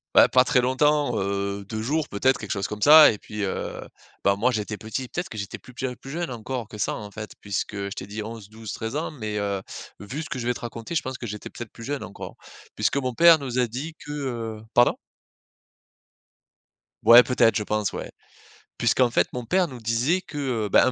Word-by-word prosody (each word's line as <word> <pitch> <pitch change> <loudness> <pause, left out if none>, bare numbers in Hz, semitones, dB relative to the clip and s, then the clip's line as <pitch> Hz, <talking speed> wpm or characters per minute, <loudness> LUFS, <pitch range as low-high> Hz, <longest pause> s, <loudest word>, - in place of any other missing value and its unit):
Bah - - +8
pas 130 0 +5
très 130 0 +3
longtemps, 145 +3 +2
heu, 100 0 -2
2 110 -1 -3
jours 150 +5 -1
peut-être 130 +6 +2
quelque 105 - -7
chose 100 -1 -1
comme 105 0 -7
ça. 155 +1 +9
Et 105 - -6
puis, 105 -1 -6
heu, 95 - -3 0.4
bah, 100 0 +4
moi 115 +6 +2
j'étais 105 -2 -2
petit 110 +5 -5
peut-être 175 +8 -4
que 110 - -8
j'étais 100 +1 -5
plus 125 - -15
p 125 0 -3
plus 135 - -12
jeune 165 +1 -3
encore 120 0 -5
que 105 -1 -10
ça - - 0
en 105 -1 -8
fait 105 +1 -7
puisque 100 +1 -3
je 100 0 -3
t'ai 100 -1 -7
dit 105 +1 -5
11-12-13 110 +1 -7
ans. 155 +2 -2
Mais, 110 -7 -4
heu, 100 -1 -1 0.4
vu 130 +10 -5
ce - - -9
que 135 - -4
je 120 - -3
vais 125 - +2
te - - -9
raconter 120 +5 -6
je 150 - +1
pense 130 0 -5
que 120 - -5
j'étais 105 0 -7
peut-être 120 -2 -8
plus 115 - -11
jeune 140 +3 -3
encore. 100 - -8 0.4
Puisque - - +1
mon 130 -2 -1
père 165 +4 +7
nous 130 -3 -3
a 125 - +3
dit 135 +8 -5
que, - - -8
heu 120 -7 -4
pardon? 120 0 +5 2.1
Ouais. 120 +1 +10
Peut-être, 125 -3 +3
je 105 - 0
pense. 105 -1 -1
Ouais. - - -6 0.7
Puisqu'en 125 -2 +3
fait 115 - +2
mon 125 -1 -4
père 185 +6 +2
nous 130 -5 -9
disait 120 +11 +1
que, 150 - -10 0.3
heu, - - -4
bah, - - +6
un 130 - +2
120 Hz, 225 wpm, -25 LUFS, 105-135 Hz, 2.1 s, Ouais